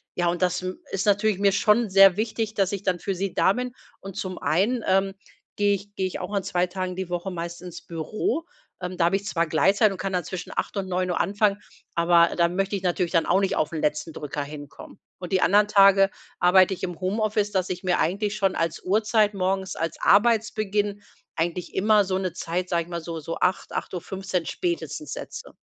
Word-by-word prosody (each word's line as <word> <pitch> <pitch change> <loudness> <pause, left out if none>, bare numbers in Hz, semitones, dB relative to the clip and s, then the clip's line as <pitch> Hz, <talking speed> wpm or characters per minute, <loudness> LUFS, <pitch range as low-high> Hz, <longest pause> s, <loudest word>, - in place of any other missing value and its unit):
ja 175 -1 +1
und 175 +1 -1
das, 180 0 +1
hm, 185 0 -5
ist 195 +1 -1
natürlich 205 -1 +2
mir 200 -1 +4
schon 215 +1 +3
sehr 195 0 +7
wichtig, 220 0 -2
dass 195 -1 +1
ich 200 0 -4
dann 180 -2 0
für 195 +1 -3
sie 195 0 -3
da 190 - +3
bin. 250 0 -4 0.3
Und 195 -1 -9
zum 185 -1 -4
einen, 210 +9 +1
ähm, 195 +1 +2 0.4
gehe 205 0 +3
ich 200 +1 -6
gehe 190 - 0
ich - - -6
auch 185 +2 -6
an 200 -2 0
2 180 0 0
Tagen 185 0 -4
die 185 -1 -4
Woche 175 +2 -3
meist 170 0 -6
ins 175 -2 -8
Büro. 215 - -3 0.3
Ähm, 180 0 -5
da 170 -1 +2
habe 185 +3 +2
ich 200 - -2
zwar 170 -4 0
Gleitzeit 195 +6 +3
und 190 - -6
kann 195 0 -3
dann 180 -2 0
zwischen 180 +2 -6
8:00 - - -3
und 190 -1 -2
9:00 180 -1 -1
anfangen, 205 0 +1 0.4
aber 170 0 +5
dann 170 +1 +2
möchte 195 +1 0
ich 195 - -4
natürlich 175 -1 0
dann 165 -2 +2
auch 185 +2 +3
nicht 195 - 0
auf 155 - 0
'n 155 - -3
letzten 150 +2 -1
Drücker 145 0 -4
hinkommen. 145 -1 -11 0.2
Und 180 0 -8
die 185 - +3
anderen 205 +3 +4
Tage 195 -1 +6 0.3
arbeite 185 +1 +5
ich - - -14
im 180 -2 -4
Homeoffice, 210 +2 0
dass 185 -2 0
ich 180 - -4
mir 180 -1 +1
eigentlich 200 +5 0
schon 195 -3 +1
als 165 -1 -2
Uhrzeit 210 +2 +2
morgens 190 0 -1
als 165 0 -3
Arbeitsbeginn 210 -2 +2 0.3
eigentlich 170 +2 -2
immer 210 +1 +4
so 185 0 -1
'ne 185 -3 -3
Zeit, 180 +1 -3
sage 170 -1 +1
ich - - -18
mal, 170 -1 -4
so 165 0 -6
so 165 +2 -5
8:00 180 +1 0
8:15 185 -1 -3
spätestens 160 -3 -3
setze. - - -8
185 Hz, 215 wpm, -25 LUFS, 175-200 Hz, 0.4 s, sehr